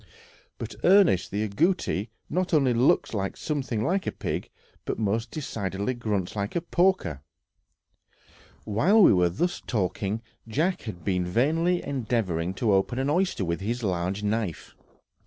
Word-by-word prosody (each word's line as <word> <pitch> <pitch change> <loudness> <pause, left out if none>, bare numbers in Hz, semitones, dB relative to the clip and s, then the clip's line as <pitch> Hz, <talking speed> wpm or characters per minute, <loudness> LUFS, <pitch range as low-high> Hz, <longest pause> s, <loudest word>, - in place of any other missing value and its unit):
But, - - -6
Ernest, 185 - +5
the 105 +2 -1
agouti 120 - 0 0.2
not 180 0 0
only 135 -5 +3
looks 120 +1 +3 0.2
something 130 -8 -2
like 185 +8 0
a - - +1
pig, - - -4 0.3
but - - -3
most 110 +2 -1
decidedly 105 -6 -3
grunts 105 -6 -2
like 100 0 -3
a 170 - +1
porker." 170 - +1 1.4
While 180 - +4
we - - +7
were 90 -2 +3
thus 175 - -1
talking, 100 +1 -2 0.2
Jack 160 - 0
had 85 -5 -9
been 90 0 0
vainly 160 - +1
endeavoring 105 -10 -1
to 110 0 +1
open 95 +5 +1
an 135 +2 0
oyster 175 - +1
with 85 +2 -2
his 120 +4 -2
large 95 +1 -1
knife. 105 -5 -2
115 Hz, 140 wpm, -26 LUFS, 95-155 Hz, 1.4 s, we